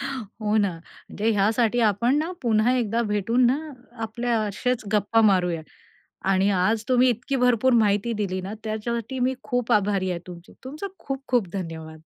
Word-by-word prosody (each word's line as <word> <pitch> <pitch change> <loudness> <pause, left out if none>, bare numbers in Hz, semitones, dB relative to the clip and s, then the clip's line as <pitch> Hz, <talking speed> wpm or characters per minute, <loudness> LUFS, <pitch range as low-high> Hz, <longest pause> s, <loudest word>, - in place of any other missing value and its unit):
हो 220 -4 -3
ना, 200 -3 +2
म्हणजे 210 +5 -4
ह्यासाठी 220 +3 +2
आपण 235 +7 +1
ना 315 +3 -1
पुन्हा 225 +1 +3
एकदा 230 -1 0
भेटून 230 +3 +1
ना, 255 +4 +2 0.4
आपल्या 235 +1 -1
असेच 215 +3 -2
गप्पा 215 +2 +3
मारूयात 180 -6 +2 0.7
आणि 195 +1 +3
आज 210 +4 +1
तुम्ही 255 0 +4
इतकी 245 +3 -1
भरपूर 250 0 +3
माहिती 215 0 +2
दिली 195 -3 -2
ना, 190 +3 -6
त्याच्यासाठी 230 +3 -3
मी 255 +1 +1
खूप 245 -3 -1
आभारी 200 -2 +2
आहे 175 - -2
तुमची. 175 -1 -11
तुमचे 300 +9 -6
खूप 270 0 -5
खूप 240 -8 +1
धन्यवाद! 160 -4 -6
220 Hz, 160 wpm, -24 LUFS, 200-245 Hz, 0.7 s, तुम्ही